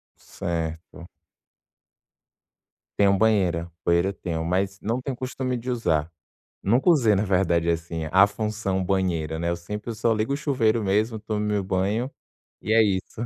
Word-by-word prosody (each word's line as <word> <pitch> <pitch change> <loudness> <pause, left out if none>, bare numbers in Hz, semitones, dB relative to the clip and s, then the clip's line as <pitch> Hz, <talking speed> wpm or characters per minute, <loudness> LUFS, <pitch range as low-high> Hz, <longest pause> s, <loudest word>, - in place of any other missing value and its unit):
Certo. 85 +1 -5 1.9
Tenho 100 -1 +4
banheira. 90 -6 +2
Banheira, 85 +2 +3
eu - - -4
tenho, 80 -4 -4
mas 95 +3 -1
não 115 +4 -1
tenho 135 +1 -3
o - - -10
costume 130 0 -3
de 120 +2 -6
usar, 80 -10 0 0.5
nunca 120 - +2
usei 120 -10 +4
na 100 +2 +1
verdade, 90 -4 +1
assim 85 -1 -2
a 95 +3 +6
função 105 -2 -2
banheira, 85 -4 -1
né, 85 +1 -1
eu 85 - -1
sempre 105 +6 -6
eu - - -4
só 115 +2 +1
ligo 110 +5 -1
o - - +1
chuveiro 120 -7 +1
mesmo, 105 +3 +1
tomo 110 0 -3
meu 105 -1 0
banho 100 +7 -1 0.5
e 110 - -1
é 115 0 +6
isso. 100 0 -1
100 Hz, 165 wpm, -25 LUFS, 85-110 Hz, 1.9 s, a